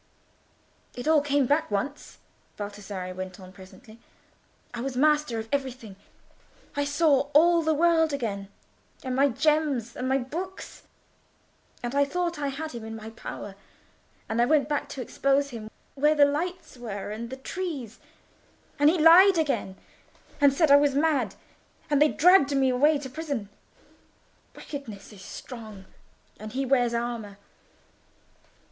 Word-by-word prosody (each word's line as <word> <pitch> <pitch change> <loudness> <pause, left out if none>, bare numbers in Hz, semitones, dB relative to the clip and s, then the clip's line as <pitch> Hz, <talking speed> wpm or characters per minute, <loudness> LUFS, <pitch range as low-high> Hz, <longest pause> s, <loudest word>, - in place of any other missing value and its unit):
"It 245 +3 -6
all 315 -2 +5
came 285 -1 +1
back 295 +5 +1
once," 240 +8 -4 0.4
Baldassarre 205 -3 -6
went 185 0 -7
on 185 0 -12
presently. 200 +4 -15 0.7
"I 240 - -5
was 260 0 -4
master 300 -3 +2
of 220 0 -5
everything. 255 -7 -3 0.8
I 285 0 0
saw 285 -2 +2
all 340 +2 +6
the 315 -1 +1
world 325 0 +3
again, 210 -8 -3 0.6
and 255 -1 -3
my 280 +2 +4
gems, 280 -3 0
and 255 +1 -3
my 265 - +3
books; 340 +9 -6 1.0
and 240 +1 -3
I 285 0 +4
thought 340 +3 -2
I 285 - -1
had 310 +3 -5
him 235 -2 -8
in 225 0 -7
my 220 0 -9
power, 205 -3 -8 0.7
and 225 +2 0
I - - +5
went 295 -1 +2 0.2
to 265 - -6
expose 275 +3 0
him 220 -2 -8 0.2
where—where 300 +2 +2
the 290 -1 +6
lights 340 +2 -3
were 210 -4 -6
and 230 +2 -6
the 260 - -7
trees; 270 - -5 0.8
and 290 +1 +6
he 350 - +2
lied 345 +4 +7
again, 280 -11 -1 0.7
and 285 -1 +6
said 290 +2 +2
I 285 - +9
was 285 -1 +2
mad, 280 -9 +1 0.6
and 290 -1 +3
they 300 - +6
dragged 310 -5 +4
me 265 -1 +3
away 290 +5 +3
to 280 -1 -7
prison... 280 -7 -5 1.1
Wickedness 230 -9 -9
is 195 - -14
strong; 215 -5 -10 0.5
and 215 0 -8
he 270 +1 -1
wears 245 -3 +2
armour." 235 -4 -4
275 Hz, 150 wpm, -26 LUFS, 230-300 Hz, 1.1 s, I